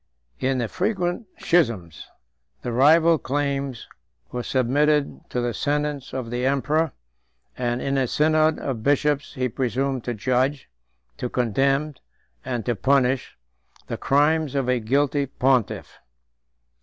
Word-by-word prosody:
In 130 0 0
the 120 -2 -1
frequent 185 - -2
schisms, 115 - 0 0.6
the 120 - -3
rival 160 +6 +5
claims 140 -2 -2 0.4
were 125 - -3
submitted 140 +4 +1
to 125 - -1
the 120 -1 -1
sentence 145 -2 -2
of 125 -3 -5
the 120 +1 -2
emperor; 140 +4 +1 0.6
and 120 -1 -2
in 135 0 0
a 130 - +1
synod 155 +3 +3
of 130 -5 -4
bishops 145 +3 +1
he 130 -1 0
presumed 130 +1 -1
to 120 - -2
judge, 130 - 0 0.5
to 125 - -3
condemn, 135 +6 +1 0.5
and 125 -4 -3
to 120 - 0
punish, 130 +3 +1 0.5
the - - -4
crimes 150 +1 +2
of 135 -2 0
a 125 -1 +2
guilty 140 +4 +1
pontiff. 130 -3 0
135 Hz, 130 wpm, -24 LUFS, 125-145 Hz, 0.6 s, rival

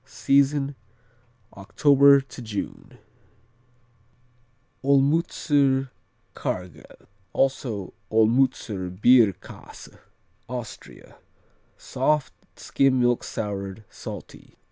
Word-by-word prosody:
Season, 140 0 +1 0.8
October 140 +7 +4
to 135 -1 -12
June. 110 -3 -7 1.9
Olmützer 140 -1 +2 0.4
Quargel, 90 -1 -7 0.3
also 120 -8 -1 0.2
Olmützer 110 -4 +1
Bierkäse 115 -4 +1 0.5
Austria 125 -3 -9 0.6
Soft; 135 0 -1 0.2
skim 135 -2 +1
milk 120 -1 +1
soured; 100 0 -5
salty. - - -10
130 Hz, 60 wpm, -24 LUFS, 110-140 Hz, 1.9 s, October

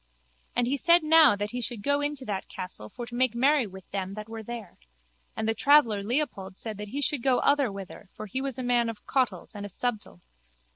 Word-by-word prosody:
And 245 - +2
he 270 +4 0
said 340 +4 +4
now 310 -6 +7
that 205 +1 -3
he 245 0 -3
should 235 -3 -4
go 285 +3 +2
in 290 +1 0
to 265 -2 -7
that 195 -4 -3
castle 145 - -7
for 240 - -7
to 240 - -11
make 245 -1 +1
merry 265 0 +3
with 190 -1 -12
them 195 0 -3
that 215 0 -7
were 225 0 -7
there. 225 -3 -8 0.6
And 220 - -2
the 225 - +2
traveller 240 -6 +4
Leopold 205 -5 -2
said 215 -3 -6
that 210 - -5
he 275 +7 -4
should 285 -1 0
go 255 0 +3
otherwhither 205 -9 0
for 215 - -7
he 260 +6 -3
was 270 -3 -3
a 255 - -3
man 240 -1 +2
of 225 -2 -8
cautels 235 -10 -1
and 205 -1 -7
a 205 - -6
subtile. 215 - -3
235 Hz, 230 wpm, -27 LUFS, 205-270 Hz, 0.6 s, now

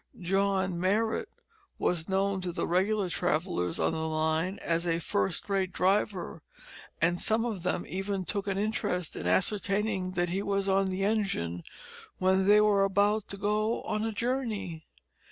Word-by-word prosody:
John 190 -1 0
Marrot 220 - +1 0.5
was 170 -1 0
known 195 0 +1
to 180 -1 -3
the - - -2
regular 195 +3 +1
travellers 165 - -1
on 80 - +2
the 160 0 -2
line 160 +4 0
as 170 +1 0
a 165 -1 +2
first 100 -11 -1
rate 195 -2 0
driver, 185 -3 0 0.6
and 175 +2 +1
some 225 +2 +3
of 215 -6 -3
them 180 0 -1
even 195 0 -3
took 200 +3 -3
an 195 -1 -1
interest 195 -5 -1
in - - -4
ascertaining 195 - +1
that 175 -1 0
he 190 +3 -1
was 200 -1 0
on 195 0 +3
the 190 +1 -2
engine 195 - -1 0.6
when 190 +1 +2
they 210 +1 +7
were 210 -2 +4
about 200 +2 +2
to 200 - -7
go 210 +3 0
on 215 - -2
a 225 - -1
journey. 215 -8 -3
190 Hz, 160 wpm, -29 LUFS, 175-205 Hz, 0.6 s, they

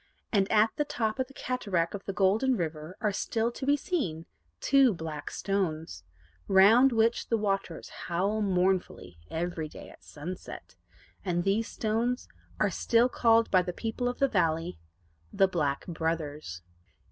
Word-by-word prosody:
And 195 -2 +2
at 220 +1 +4
the 295 - +2
top 245 -6 -2
of 260 - 0
the 275 - -16
cataract 200 -10 -1
of 200 -1 -7
the - - -2
Golden 210 +7 +2
River 160 +1 -4
are 210 -3 +1
still 225 +3 -1
to 265 - -6
be 285 +1 +4
seen 180 - -2 0.3
two 270 -6 +4
BLACK 160 -3 -6
STONES, 160 - -2 0.4
round 220 +8 +6
which 230 0 +2
the 230 - +1
waters 195 -5 -2 0.2
howl 195 +5 0
mournfully 180 - 0
every 165 -1 -3
day - - -11
at - - -18
sunset, 175 +5 -8 0.5
and 175 -2 0
these 200 +4 +1
stones 235 +3 -1 0.3
are - - +2
still 235 +2 +3
called 230 -2 +3
by 185 - +5
the 180 0 -4
people 235 +4 -2
of 245 - -5
the 275 - +3
valley 165 - 0 0.5
The 195 - +4
Black 145 -7 -1
Brothers. 155 - -3
195 Hz, 155 wpm, -29 LUFS, 165-230 Hz, 0.5 s, round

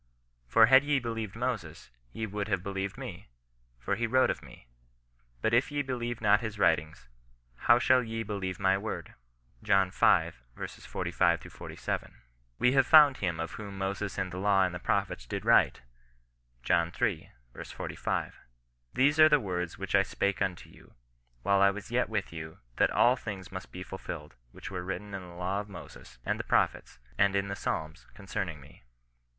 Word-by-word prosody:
For 110 - +6
had 130 +4 +7
ye 145 -1 +2
believed 115 -4 -4
Moses, 110 - -4 0.2
ye 110 - -4
would 105 0 -4
have 90 - -1
believed 100 -1 -4
me: - - -8 0.5
for 95 +11 -2
he 115 +2 -1
wrote 130 +3 +3
of - - -6
me. - - -15 0.8
But 110 - +1
if 120 +4 +3
ye 145 0 -1
be 130 -1 -3
lieve 120 -1 -4
not 105 -2 +5
his 110 -2 -5
writings, 80 -8 +1 0.5
how 120 - +4
shall 130 +1 +4
ye 115 -1 -4
believe 95 -4 -4
my 95 0 +3
word." 110 +1 -5 0.5
John 95 -1 +3
v. - - -17 0.6
45—47. - - -2 0.2
" - - -40
We 125 - +3
have 135 -1 +3
found 150 -4 +8
him 85 -4 -2
of 80 0 -3
whom 100 -2 -8
Moses 100 +1 -3
in 95 -1 -2
the 90 - -5
law 100 -1 +3
and 90 -1 0
the 90 - -5
prophets - - -1
did - - -4
write." - - +4 0.8
John 85 +4 +2
iii. - - -1 0.2
4 - - -7 0.3
5. - - -3 0.2
" - - -36
Tkese 145 +4 +3
are 155 0 +9
the 150 - +5
words 90 -6 -3
which - - -5
I - - +6
spake 100 -2 -1
unto 90 -3 -2
you, - - -19 0.5
while 100 -1 +3
I 100 - +7
was 105 +3 -6
yet 125 +1 +1
with 105 -6 -3
you, 80 -1 -7 0.2
that - - +4
all 125 +2 +4
things 100 -7 -7
must 95 -1 -8
be 90 - -7
fulfilled 85 -6 -7 0.2
which 100 - -9
were 90 -2 -4
written 100 +2 -5
in 95 - -4
the 90 -1 -12
law 90 +3 -2
of 105 0 -7
Moses, 85 -8 -12
and - - -1
the - - -2
prophets, - - 0 0.2
and 100 0 +4
in 100 0 0
the 100 - -3
Psalms, 80 -3 -4
concerning 95 -5 -4
me." 70 - -17
100 Hz, 185 wpm, -30 LUFS, 90-115 Hz, 0.8 s, are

